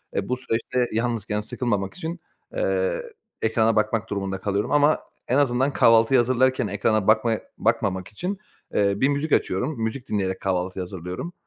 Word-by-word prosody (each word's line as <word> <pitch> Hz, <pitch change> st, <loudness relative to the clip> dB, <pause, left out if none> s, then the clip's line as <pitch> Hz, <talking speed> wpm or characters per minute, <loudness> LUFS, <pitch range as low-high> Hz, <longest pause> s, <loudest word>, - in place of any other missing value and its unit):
E, -, -, -2 dB
bu 125 Hz, -, 0 dB
süreçte 125 Hz, 0 st, -1 dB
yalnızken 115 Hz, -2 st, -1 dB
sıkılmamak 105 Hz, -3 st, -2 dB
için, 170 Hz, 0 st, -5 dB, 0.4 s
eee, -, -, 0 dB, 0.4 s
ekrana 110 Hz, 0 st, +2 dB
bakmak 110 Hz, +1 st, 0 dB
durumunda 95 Hz, -1 st, -3 dB
kalıyorum. 100 Hz, +1 st, -1 dB
Ama 145 Hz, +1 st, +4 dB, 0.3 s
en 125 Hz, -, +2 dB
azından 135 Hz, 0 st, +2 dB
kahvaltıyı 115 Hz, +2 st, +5 dB
hazırlarken 130 Hz, 0 st, +2 dB
ekrana 105 Hz, 0 st, 0 dB
bakma 110 Hz, +1 st, +4 dB, 0.3 s
bakmamak 100 Hz, -5 st, 0 dB
için, 180 Hz, -, -4 dB, 0.4 s
eee, 100 Hz, -1 st, +3 dB
bir 135 Hz, +6 st, +3 dB
müzik 145 Hz, +2 st, -1 dB
açıyorum. 115 Hz, +6 st, 0 dB
Müzik 120 Hz, +3 st, -4 dB
dinleyerek 95 Hz, -2 st, -1 dB
kahvaltıyı 95 Hz, 0 st, -1 dB
hazırlıyorum. 90 Hz, -, -6 dB
115 Hz, 145 wpm, -24 LUFS, 100-130 Hz, 0.4 s, kahvaltıyı